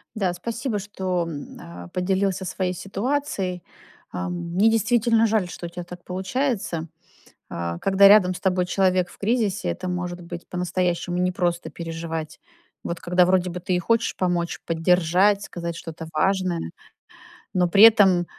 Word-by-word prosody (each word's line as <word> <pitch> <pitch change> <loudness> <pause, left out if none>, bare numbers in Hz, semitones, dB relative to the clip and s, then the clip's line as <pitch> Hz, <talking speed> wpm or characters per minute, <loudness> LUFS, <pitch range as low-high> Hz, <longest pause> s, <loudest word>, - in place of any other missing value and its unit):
Да, 190 -4 0
спасибо, 230 +4 -3
что, 190 -3 -2
м, 145 -4 -8
э, 85 +1 -10
поделился 190 +1 0
своей 185 0 -2
ситуацией. 195 - -2 0.5
Ам, 90 - -4 0.2
мне 210 +4 +4
действительно 225 +1 +3
жаль, 210 -5 +1
что 175 - -7
у - - -6
тя 175 0 -7
так 175 0 -11
получается. 190 - -2 0.6
Э, 85 0 -4
когда 195 0 +6
рядом 195 -3 +6
с - - -8
тобой 180 -2 +1
человек 185 -1 +1
в - - -16
кризисе, 210 - 0
это 180 - -4
может 180 0 -4
быть 170 0 -8
по-настоящему 180 0 -1
непросто 180 -1 -1
переживать. 165 -1 -6 0.4
Вот 170 0 -4
когда 180 +1 +3
вроде 185 0 +2
бы 180 +1 -5
ты 180 +1 -1
и - - +1
хочешь 230 +5 +1
помочь, 175 -2 -1
поддержать, 180 +4 +3
сказать 170 -1 -5
что-то 165 -1 -8
важное, 180 - 0 0.8
но 180 -1 +2
при 200 +4 +6
этом 195 -6 +7
180 Hz, 150 wpm, -24 LUFS, 170-195 Hz, 0.8 s, этом